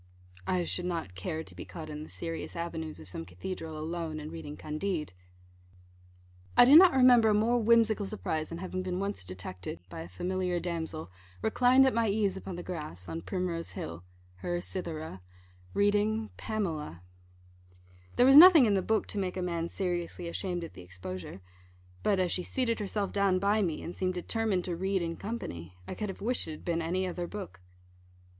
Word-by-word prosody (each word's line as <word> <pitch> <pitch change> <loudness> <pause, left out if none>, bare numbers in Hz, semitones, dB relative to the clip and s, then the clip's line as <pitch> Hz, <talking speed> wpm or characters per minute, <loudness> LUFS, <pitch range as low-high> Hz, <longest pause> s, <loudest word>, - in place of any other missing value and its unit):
I 180 -1 +1
should 180 +1 -2
not 165 - -3
care 155 - -4
to - - -13
be - - -7
caught 160 -2 -8
in 150 -1 -6
the 155 - -9
serious 165 -1 -5
avenues 165 -2 -4
of - - -10
some 85 -2 -5
cathedral 155 - -6
alone, 160 0 -3
and 155 +1 -7
reading 150 -3 -7
Candide. 155 - -3 1.4
I - - +10
do 275 +4 +8
not 360 +2 +9
remember 250 -4 +6
a - - +4
more 230 +3 +3
whimsical 220 -2 +4
surprise 160 -7 -2
than 165 - -5
having 185 +1 -4
been 185 0 -2
once 200 - -3
detected 90 -1 -7
by 80 - -7
a 80 - -7
familiar 180 - -1
damsel 160 - -4 0.3
reclined 250 +4 +5
at 265 - +3
my 230 0 +2
ease 200 -2 +1
upon 190 -1 -6
the 175 - -6
grass, 150 - -6
on 165 - -4
Primrose 180 -3 -3
Hill 85 +2 -6 0.3
(her 175 - -2
Cythera), 160 - -5 0.5
reading 210 +2 +2
Pamela. 160 - -3 1.1
There 245 - +5
was 270 +1 +7
nothing 335 -4 +11
in 210 - +3
the 195 - +2
book 220 +3 +1
to 205 - -2
make 185 -1 -2
a - - -1
man 170 -1 -2
seriously 175 -2 -3
ashamed 175 0 -2
at 165 - -8
the - - -11
exposure; 90 +1 -7 0.6
but 200 -2 +2
as 180 -2 +1
she 180 - 0
seated 230 +3 -1
herself 205 -1 -2
down 200 -2 +2
by 200 +3 +2
me, 170 -6 -1
and 170 - -5
seemed 185 -1 -1
determined 195 0 0
to 175 - -2
read 190 +1 0
in 165 0 -3
company, 90 - -6
I - - -4
could 210 -2 -4
have 195 - -7
wished 240 -1 0
it - - -4
had 155 - -11
been 170 -1 0
any 180 +3 0
other 175 -1 -3
book. 195 - -8
180 Hz, 190 wpm, -30 LUFS, 160-205 Hz, 1.4 s, nothing